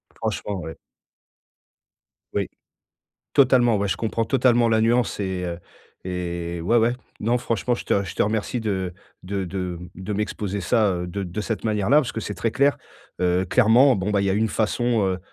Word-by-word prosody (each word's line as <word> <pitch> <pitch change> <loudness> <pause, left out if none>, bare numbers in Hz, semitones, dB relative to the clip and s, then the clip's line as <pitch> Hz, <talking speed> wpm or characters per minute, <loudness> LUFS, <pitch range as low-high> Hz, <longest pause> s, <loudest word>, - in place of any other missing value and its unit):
Franchement, 100 -2 -3
ouais. 80 - -7 1.6
Oui. - - -1 0.8
Totalement 125 -4 +5
ouais, 100 0 0
je - - 0
comprends 115 0 -1
totalement 120 -2 +3
la 110 -1 +3
nuance 115 -1 +1
et 95 -2 -2
heu 85 -1 -4 0.5
et 85 -2 -4
ouais, 100 +8 +2
ouais, 115 +1 +3 0.3
non 120 +3 +1
franchement 120 0 -1
je - - -7
te 100 - +1
je 90 - -7
te - - +2
remercie 110 +3 -1
de 95 -5 -2 0.3
de 95 0 -2
de 90 +1 -5
m'exposer 100 -1 -2
ça, 105 +3 +2
heu, 90 0 -3
de 100 +2 -4
de 90 +4 -4
cette 110 0 -3
manière-là. 105 +4 +2
Parce 150 -5 +2
que 110 - -4
c'est 105 - -5
très 110 +5 -1
clair. 140 +1 +2 0.4
Heu, 90 +1 +2
clairement, 125 +5 +5
bon, 95 +2 -2
bah 100 - +2
il - - 0
y - - +2
a - - +2
une 110 +2 +1
façon, 115 +1 +1
heu, 95 -1 -1
105 Hz, 185 wpm, -23 LUFS, 95-115 Hz, 1.6 s, Totalement